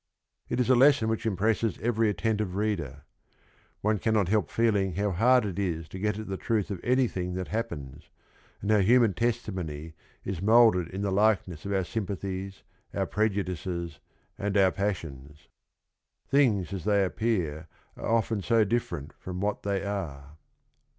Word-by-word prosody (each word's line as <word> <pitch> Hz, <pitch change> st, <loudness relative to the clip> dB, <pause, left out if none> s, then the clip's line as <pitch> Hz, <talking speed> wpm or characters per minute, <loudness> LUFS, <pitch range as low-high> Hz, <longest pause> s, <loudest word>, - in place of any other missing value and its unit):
It -, -, -1 dB
is 125 Hz, -, +2 dB
a -, -, +6 dB
lesson 130 Hz, -3 st, +5 dB
which 110 Hz, 0 st, -1 dB
impresses 110 Hz, +1 st, 0 dB
every 115 Hz, -1 st, +1 dB
attentive 105 Hz, 0 st, -1 dB
reader. 85 Hz, -10 st, -2 dB, 0.8 s
One 105 Hz, 0 st, +1 dB
cannot 105 Hz, -4 st, +1 dB
help 110 Hz, 0 st, +1 dB
f -, -, -16 dB
eeling 100 Hz, -6 st, +2 dB
how 100 Hz, +1 st, 0 dB
hard 125 Hz, +6 st, +4 dB
it 100 Hz, -1 st, -4 dB
is 85 Hz, -5 st, -2 dB
to 95 Hz, -, -7 dB
get 105 Hz, +1 st, 0 dB
at 110 Hz, -, -5 dB
the 95 Hz, 0 st, -3 dB
truth 105 Hz, -2 st, -1 dB
of 95 Hz, -, -4 dB
any 125 Hz, +1 st, +3 dB
thing 90 Hz, -3 st, -4 dB
that 95 Hz, 0 st, -4 dB
happens, 85 Hz, -, -5 dB, 0.5 s
and 105 Hz, -, 0 dB
ho 105 Hz, -, +5 dB
w 95 Hz, -2 st, +2 dB
human 120 Hz, -3 st, +5 dB
testi 115 Hz, +2 st, -1 dB
mony 80 Hz, -3 st, -5 dB, 0.3 s
is 95 Hz, -3 st, -3 dB
mo 115 Hz, +3 st, +7 dB
ulded 90 Hz, -3 st, -2 dB
in 95 Hz, +2 st, -4 dB
the 100 Hz, -, 0 dB
likeness 95 Hz, -5 st, +1 dB
of—Oar 95 Hz, -1 st, 0 dB
sym 105 Hz, +2 st, -3 dB
pathiesTouTprejudices, 95 Hz, -2 st, -3 dB, 0.4 s
and 100 Hz, 0 st, 0 dB
our 95 Hz, -1 st, +5 dB
passions. 75 Hz, -8 st, -5 dB, 0.8 s
Things 110 Hz, -, +2 dB
as 95 Hz, -2 st, -5 dB
the^ 100 Hz, -2 st, +3 dB
appeal 90 Hz, -7 st, -1 dB, 0.3 s
arc 115 Hz, -1 st, +1 dB
ufleii 110 Hz, 0 st, -4 dB
ao 115 Hz, -1 st, +6 dB
difforcn 90 Hz, -, -2 dB
t -, -, -24 dB
from 90 Hz, 0 st, -6 dB
what 105 Hz, +1 st, -1 dB
they 100 Hz, -1 st, -1 dB
are. 75 Hz, -8 st, -5 dB
100 Hz, 170 wpm, -28 LUFS, 90-110 Hz, 0.8 s, mo